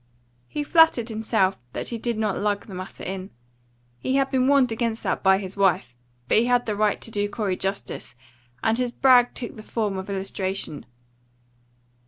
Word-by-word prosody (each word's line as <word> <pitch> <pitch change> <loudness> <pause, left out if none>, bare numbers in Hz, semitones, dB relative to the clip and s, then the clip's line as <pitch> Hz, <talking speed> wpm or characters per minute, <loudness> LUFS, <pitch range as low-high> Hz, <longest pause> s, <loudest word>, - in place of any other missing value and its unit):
He 295 - -3
flattered 305 -7 +4
himself 220 - +1
that - - -3
he 235 - -4
did 235 -1 -2
not 215 -3 0
lug 205 0 -1
the 200 - -10
matter 185 +1 -7
in. 190 0 -5 0.7
He 260 - -1
had 270 0 +2
been 260 -1 +2
warned 275 -3 +4
against 225 0 -2
that - - -1
by 190 0 +5
his 190 -1 -6
wife, 180 -11 +1 0.3
but - - +4
he 230 - +2
had 245 0 +3
the 215 - -1
right 210 0 +1
to 230 - -5
do 205 -1 -1
Corey 205 -3 -1
justice, 195 - -4 0.5
and 225 +2 +2
his 250 -1 0
brag 245 -1 +5
took 235 - -6
the - - -8
form 215 -3 -2
of 190 - -7
illustration. 190 -4 -3
215 Hz, 185 wpm, -24 LUFS, 195-240 Hz, 0.7 s, by